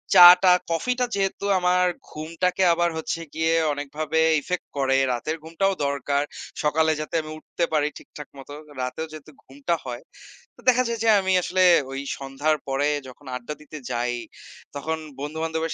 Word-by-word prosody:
চা-টা 180 +1 +10 0.2
কফি-টা 250 +9 0
যেহেতু 195 0 -1
আমার 180 0 +3 0.2
ঘুমটাকে 170 +4 -1
আবার 175 0 +1
হচ্ছে 160 +1 -3
গিয়ে 160 +1 +1 0.2
অনেকভাবে 150 +2 -2 0.2
ইফেক্ট 180 +5 -4
করে। 135 -1 +2 0.2
রাতের 155 +7 -3
ঘুমটাও 195 +5 0
দরকার। 140 0 0 0.4
সকালে 160 +1 +3
যাতে 155 - -5
আমি 155 0 -9
উঠতে 170 +2 -2
পারি 150 -1 +2
ঠিকঠাক 150 - -11
মত 135 - -12 0.3
রাতেও 125 +6 -3
যেহেতু 155 0 -11
ঘুমটা 140 +5 -2
হয় 120 -1 -5 0.5
তো - - -25
দেখা 255 0 +4
যায় 230 -1 -3
যে 225 - +3
আমি 190 0 +1
আসলে 185 +1 +1 0.3
ওই 135 - -4 0.2
সন্ধ্যার 140 +3 -1
পরে 135 +2 +1 0.2
যখন 130 +3 -14
আড্ডা 125 +4 -5
দিতে 155 +1 -10
যাই 120 +1 -1 0.6
তখন 160 +3 -2 0.2
বন্ধু-বান্ধবের 160 +2 -3
155 Hz, 155 wpm, -24 LUFS, 140-175 Hz, 0.6 s, চা-টা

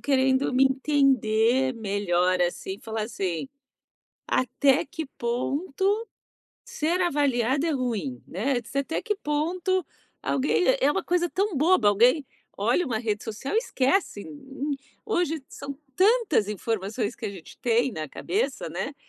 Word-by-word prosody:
querendo 265 -1 +2
me 265 - +5
entender 265 -3 +3
melhor, 185 -4 +1
assim, 175 +2 -2
e - - -21
falar, 220 -1 -3
assim: 195 0 -3 0.8
"Até 265 +2 +2
que 320 +1 -5
ponto 330 - -1 0.6
ser 335 +4 -1
avaliada 280 -4 +1
é - - +1
ruim", 215 - -2
né, 245 +8 0
de 230 - -15
ser 275 - -2
até 300 +4 -3
que 420 -3 -1
ponto 350 +4 0 0.4
alguém 360 - +2
é - - +4
uma - - -1
coisa 350 0 +1
tão 390 -4 0
boba, 305 - +4
alguém 240 +9 +4 0.3
olha 360 - +1
uma 230 -4 -1
rede 215 -3 -2
social 225 - -4
e - - +6
esquece. 275 - 0 0.8
Hoje 335 -8 0
são 280 0 -7 0.2
tantas 400 - +3
informações 210 +2 -2
que 230 - -5
a - - -3
gente 185 -5 -12
tem 240 +2 +2
na 155 -3 -5
cabeça, 410 - -2
né, - - -4
265 Hz, 140 wpm, -26 LUFS, 220-325 Hz, 0.8 s, e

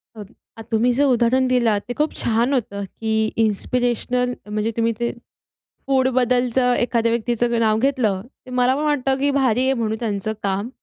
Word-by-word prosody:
Okay 205 -2 -11 0.2
अ, - - -8
तुम्ही 230 +3 +2
जर 285 - +3
उदाहरण 255 +3 +2
दिलात 235 -5 +2
ते 245 - -3
खूप 305 - +1
छान 235 +4 +1
होतं, 200 -5 -2
की 220 +3 -4 0.3
इन्स्पिरेशनल 245 +3 -1 0.2
म्हणजे 215 +2 -1
तुम्ही 230 0 +1
ते 235 - -1 0.8
फूडबद्दलचं 255 -1 +2
एखाद्या 230 -1 0
व्यक्तीचं 235 0 0
नाव 220 -1 +2
घेतलं, 235 -7 0 0.2
तर - - -10
मला 250 +1 +3
पण 300 - -2
वाटतं 270 -3 +1
की 285 +1 +1
भारी 250 -1 +2
आहे 265 - +2
म्हणून 220 -2 -2
त्यांचं 215 -2 -2
काम. 200 +3 -1
240 Hz, 165 wpm, -21 LUFS, 220-255 Hz, 0.8 s, जर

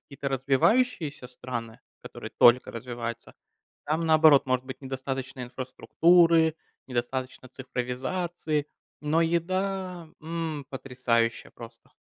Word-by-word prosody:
какие-то 140 -1 -6
развивающиеся 140 - +1
страны, 120 -3 -6 0.2
которые - - -9
только 120 +1 +6
развиваются, 115 -1 -6 0.5
там, 160 +2 -1
наоборот, 155 -3 +6
может 130 0 0
быть 130 0 -8
недостаточно 130 0 -5
инфраструктуры, 160 +6 +3 0.3
недостаточно 130 +1 -3
цифровизации, 140 +5 -3 0.3
но 155 +2 +1
еда, 180 +1 -1
м, 160 -2 -4
потрясающая 125 -3 -1
просто. 115 -1 -13
135 Hz, 95 wpm, -27 LUFS, 125-165 Hz, 0.5 s, только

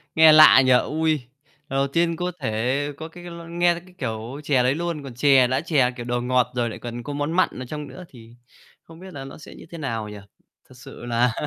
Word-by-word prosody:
Nghe 160 0 +8
lạ 155 -3 +8
nhỉ? 130 - +3
Ui, 155 +5 +2 0.6
lần 135 - -2
đầu 140 0 +1
tiên 170 +4 0
có 180 +2 -3
thể 130 +4 -1
có 160 - -7
cái 175 +2 -13
l 170 -1 -9
nghe 175 +1 +2
thấy 170 - -8
cái 185 - -19
kiểu 115 +1 -5
chè 135 -4 +2
đấy 130 +2 +2
luôn, 170 -2 -4
còn 135 -3 -9
chè 130 0 +4
đã 130 +2 0
chè, 145 -7 +2
kiểu, 120 -1 -8
đồ 120 0 -2
ngọt 125 0 +1
rồi 120 -1 0
lại - - -8
còn 120 0 -7
có 145 - -6
món 145 +2 -2
mặn 185 +2 +2
ở 130 - -6
trong 150 +2 -7
nữa, 185 - -11
thì 115 -2 -15 0.5
không 165 0 -15
biết 185 0 -11
là 135 -2 -7
nó 135 - -10
sẽ 155 - -13
như - - -13
thế 170 - -8
nào 115 -8 -4
nhỉ? 105 - -9 0.5
Thật 130 - -16
sự 120 - -11
là 120 0 +1
135 Hz, 250 wpm, -23 LUFS, 120-160 Hz, 0.6 s, Nghe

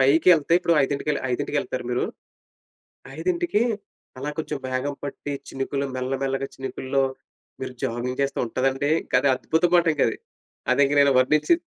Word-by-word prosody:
పైకెళ్తే 155 +4 +5
ఇప్పుడో 170 -2 +2
ఐదింటికెళ్ 140 +1 -1
ఐదింటికెళ్తారా 130 0 -2
మీరు? 125 - +1 1.1
5కి 345 - +1 0.6
అలా 140 +3 -3
కొంచుం 155 -2 -3
మేఘం 130 +3 -1
పట్టి 145 0 -5 0.2
చినుకులు, 135 +1 -2
మెల్లమెల్లగా 135 +1 -1
చినుకుల్లో 135 0 -1 0.6
మీరు 130 - -4
జాగింగ్ 125 +2 -2
చేస్తే 140 - -1
ఉంటదండీ, 135 +4 0
ఇంకది 130 +2 +2
అద్భుతమండింకది. 160 -4 +2 0.6
అదింక 140 +2 +3
నేను 140 0 +5
వర్ణించి 150 +5 +4
140 Hz, 115 wpm, -24 LUFS, 130-150 Hz, 1.1 s, పైకెళ్తే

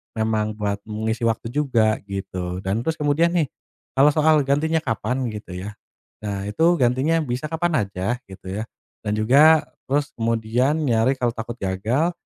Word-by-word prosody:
memang 110 -1 0
buat 105 -1 -2
mengisi 110 +2 -1
waktu 115 0 -2
juga, 120 -7 +2
gitu. 95 -2 -4
Dan, 95 +3 0
terus 160 +7 -1
kemudian, 155 +3 +2
nih, 160 -6 +1 0.4
kalau 135 +2 +5
soal 155 +1 +4
gantinya 160 +4 +2
kapan, 125 -1 -2
gitu 105 -3 -7
ya, 100 +3 -6 0.5
nah, 100 -1 -3
itu, 135 +10 0 0.2
gantinya 130 +7 +2
bisa 125 0 -3
kapan 160 -5 0
aja, 95 +5 -2
gitu 95 -1 -11
ya. 100 +4 -3 0.4
Dan 105 - -1
juga, 145 +8 +6 0.2
terus 145 +2 0
kemudian, 115 +5 +1
nyari 120 -3 +2
kalo 125 -2 0
takut 115 0 -6
gagal, 110 - 0
115 Hz, 155 wpm, -23 LUFS, 105-145 Hz, 0.5 s, juga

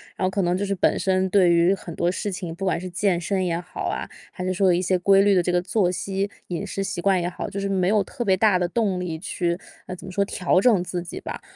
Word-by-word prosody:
然 - - -1
后 - - +2
可 195 +1 -1
能 180 0 +1
就 200 - -1
是 200 - -1
本 185 - +2
身 190 0 +1
对 185 -2 +4
于 170 +3 +4
很 175 -3 -9
多 170 +2 0
事 205 +2 -3
情， 175 -3 -5
不 195 - -4
管 180 -3 +1
是 185 +1 -6
健 175 0 0
身 190 +1 -1
也 170 -1 -1
好 180 0 -8
啊， - - -2 0.2
还 180 - -6
是 185 - -1
说 190 +1 +2
有 - - +5
一 175 - +1
些 185 0 +1
规 195 +2 +5
律 200 -1 +4
的 180 - +3
这 180 - 0
个 175 0 +2
作 185 0 +1
息、 195 +2 -2 0.2
饮 180 +2 -3
食 195 0 -3
习 175 - -4
惯 190 -1 +2
也 175 - -1
好， 180 - -5
就 200 - -5
是 200 0 -2
没 185 -2 +1
有 210 -1 +3
特 240 +5 -5
别 190 -2 +4
大 200 -1 +4
的 180 - 0
动 200 -4 0
力 165 -3 -4
去， 175 -1 -2 0.3
呃， 185 - -6
怎 180 - -12
么 - - -7
说 200 +2 +1
调 180 -1 +1
整 200 -5 +4
自 175 -1 -4
己 175 - -7
吧。 - - -6
185 Hz, 315 characters per minute, -24 LUFS, 175-195 Hz, 0.3 s, 有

